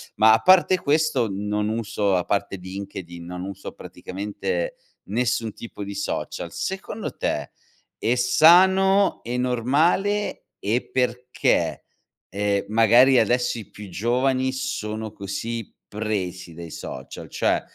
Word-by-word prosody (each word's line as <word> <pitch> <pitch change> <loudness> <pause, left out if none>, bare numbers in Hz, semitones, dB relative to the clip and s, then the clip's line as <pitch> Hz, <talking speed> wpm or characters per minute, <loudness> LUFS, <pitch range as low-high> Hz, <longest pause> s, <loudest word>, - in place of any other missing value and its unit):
Ma 110 +1 +6
a 110 - +4
parte 185 +5 +5
questo, 145 -6 +2
non 105 +2 -2
uso 105 -3 0
a 90 - +1
parte 100 -1 -1
LinkedIn, 95 -2 -8
non 90 +1 -6
uso 100 0 -7
praticamente 475 - -4 0.3
nessun 115 0 0
tipo 115 -3 -8
di 100 0 -6
social. 100 - -4
Secondo 195 +3 -4
te, - - -2 0.5
è 120 - +1
sano 190 +9 +5
e 120 +2 -3
normale 145 - +1
e 115 +5 -1
perché? 125 0 0 0.5
Ehm, 100 0 0
magari 120 +4 +6
adesso 120 +2 +1
i 110 - -10
più 105 -1 -10
giovani 130 +6 +1
sono 110 -4 -4
così 110 +3 -5
presi 95 -5 -4
dai 85 0 -8
social, - - -8
cioè, - - +1
115 Hz, 120 wpm, -24 LUFS, 100-130 Hz, 0.5 s, Ma